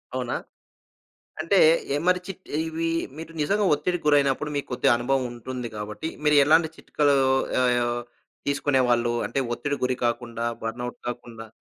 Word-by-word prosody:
అవునా? 125 -1 -2 1.1
అంటే 165 +5 +1 0.4
ఎ - - +2
మరి 180 0 +3
చిట్ 190 -1 -8 0.2
ఇవి 165 +1 -2 0.3
మీరు 165 +1 -8
నిజంగా 200 +8 +1
ఒత్తిడికి 175 +3 -2
గురైనప్పుడు 145 0 +3
మీకు 145 - -3
కొద్దిగా 125 - +3
అనుభవం 130 +2 0
ఉంటుంది, 125 +1 -6
కాబట్టి 105 +7 -5 0.2
మీరు 150 0 +5
ఎలాంటి 160 +3 +4
చిట్కాలు 145 -1 +1 0.5
ఆహ్, 120 -1 +1 0.5
తీసుకునేవాళ్ళు? 130 -4 +2
అంటే - - -3 0.2
ఒత్తిడి 145 +5 -2
గురి 125 0 0
కాకుండా 120 -1 -2 0.2
బర్నౌట్ 120 +2 -4
కాకుండా? 120 -2 -7
130 Hz, 135 wpm, -25 LUFS, 120-150 Hz, 1.1 s, మీరు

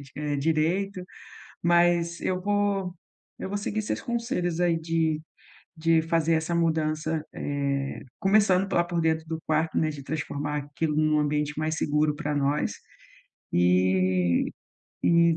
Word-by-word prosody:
eh, 150 -1 -2
direito, 170 +6 0 0.6
mas 170 0 +3
eu 185 0 -1
vou 200 -2 0 0.5
eu 190 - -4
vou 205 - -1
seguir 210 +1 -2
seus 210 - -3
conselhos 205 -8 -2
aí 170 -2 +2
de 160 -1 0 0.5
de 165 0 +3
fazer 165 0 +1
essa 160 +1 0
mudança, 160 -1 0
eh, 140 -1 -2 0.2
começando 195 -2 +3
lá 175 - +4
por 175 -1 -2
dentro 160 0 +1
do 160 0 -4
quarto, 160 +1 0
né, 155 - +2
de 145 -2 -7
transformar 150 0 -3
aquilo 145 +2 -2
num 155 0 +3
ambiente 150 0 0
mais 155 0 -1
seguro 150 -1 +1
para 150 0 -2
nós 145 +1 +1 0.8
e 90 0 +3 0.5
e 170 -1 +4
160 Hz, 135 wpm, -26 LUFS, 150-175 Hz, 0.8 s, lá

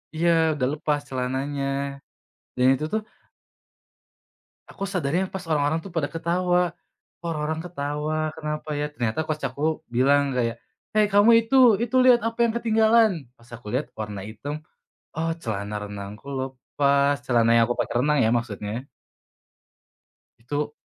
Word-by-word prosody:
Iya, 170 +2 +2 0.2
udah 130 -4 0
lepas 150 -1 0
celananya 130 +2 -2 0.9
dan 125 0 +3
itu 150 - -3
tuh 220 - +1 1.7
aku 195 - -8
sadarnya 175 -1 0
pas 190 -2 -4
orang-orang 150 +1 +1
tuh 195 - -8
pada 150 -3 0
ketawa. 175 +2 +1 0.6
Kok - - -13
orang-orang 155 0 -2
ketawa, 150 -2 -3 0.2
kenapa 150 -1 -5
ya? 150 - 0
Ternyata 120 -1 -2
coach 155 -1 -3
aku 130 +3 -10 0.3
bilang 140 +3 +4
kayak, 115 -2 0 0.4
"Hai 215 0 +5
kamu 205 +3 +6 0.2
itu, 270 - +1 0.3
itu 240 +2 -3
lihat 250 -2 +7
apa 230 +1 -6
yang 225 - -2
ketinggalan," 225 -1 +4 0.3
pas 115 0 -21
aku 115 -2 -14
lihat 140 +3 -1
warna 105 -2 -4
hitam, 115 +7 -6 0.6
oh, 165 +1 0
celana 105 -1 -4
renangku 105 +4 -8
lepas. 140 +2 +1
Celana 120 -2 +3
yang 115 - +6
aku 120 - 0
pakai - - -2
renang 150 -1 +3
ya, 110 - +3
maksudnya. 115 +1 -5 1.5
Itu 145 +5 -3
145 Hz, 140 wpm, -24 LUFS, 125-165 Hz, 1.7 s, lihat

